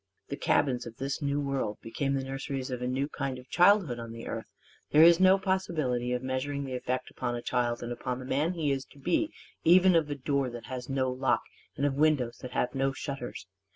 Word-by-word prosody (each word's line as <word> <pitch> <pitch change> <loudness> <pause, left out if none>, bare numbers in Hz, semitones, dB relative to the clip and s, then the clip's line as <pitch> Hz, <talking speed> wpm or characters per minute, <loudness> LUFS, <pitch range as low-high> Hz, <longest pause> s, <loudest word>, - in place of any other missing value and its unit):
The - - -2
cabins 125 -3 +1
of 115 -1 -10
this 135 +3 -3
New 140 0 0
World 135 -7 -2
became 135 +4 -2
the 135 - -1
nurseries 135 0 -4
of 125 -1 -4
a 125 - -1
new 130 +2 0
kind 135 -3 -3
of 125 0 -12
childhood 180 - +4
on 115 -1 -7
the 115 0 -8
earth. 115 -1 -5 0.4
There 155 +2 +7
is 170 +1 +8
no 190 +1 +6
possibility 155 -11 -1
of 125 0 -1
measuring 135 +2 -2
the 135 -1 -5
effect 125 0 -3
upon 120 - -3
a 120 - -4
child 120 -1 0
and 120 - -4
upon 125 +1 -3
the 130 - -8
man 145 +7 0
he 155 -5 0
is 135 -1 -1
to - - -19
be 180 - 0 0.3
even 185 +2 +6
of 160 -3 +3
a 145 - -2
door 140 -1 0
that 120 -1 -8
has 125 -1 -6
no 130 -1 0
lock 130 +1 +1 0.3
and 140 - +1
of 145 - +1
windows 140 -5 +2
that 125 -1 -7
have 125 - 0
no 135 0 0
shutters. 135 -6 -6
135 Hz, 225 wpm, -29 LUFS, 125-145 Hz, 0.4 s, is